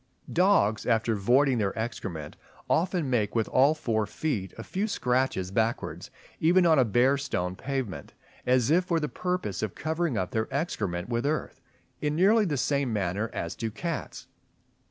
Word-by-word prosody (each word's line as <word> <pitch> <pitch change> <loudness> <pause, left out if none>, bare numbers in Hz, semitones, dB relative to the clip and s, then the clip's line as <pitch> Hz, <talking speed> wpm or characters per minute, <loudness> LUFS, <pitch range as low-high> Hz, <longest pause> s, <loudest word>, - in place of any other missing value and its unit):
} - - -11
Dogs 110 - +2
after 115 -1 +2
voiding 125 +5 +3
their 100 -1 -1
excrement 95 -9 -5 0.3
often 175 -2 +1
make 110 -5 0
with 115 -2 +1
all 140 +4 +4
four 110 -7 -1
feet 105 -8 -3
a 115 - -6
few 195 - -2
scratches 125 - 0
backwards, 115 +3 -1 0.3
even 175 +3 +4
on 160 -4 +5
a - - +6
bare 125 +6 +3
stone 90 -10 -2
pavement, 120 - -4 0.3
as 125 +1 +2
if 180 +3 +4
for 170 -2 +1
the 150 - -1
purpose 180 - -3
of 110 -3 -3
covering 160 -4 -1
up 95 -2 -2
their 110 +2 -2
excrement 100 - -2
with 120 +3 -1
earth, 155 +1 -3 0.4
in 150 0 0
nearly 205 +6 +4
the 150 -6 -1
same 140 -1 0
manner 100 +1 -1
as 85 - -4
do 115 - -3
cats. 155 +6 -5
125 Hz, 170 wpm, -27 LUFS, 105-155 Hz, 0.4 s, a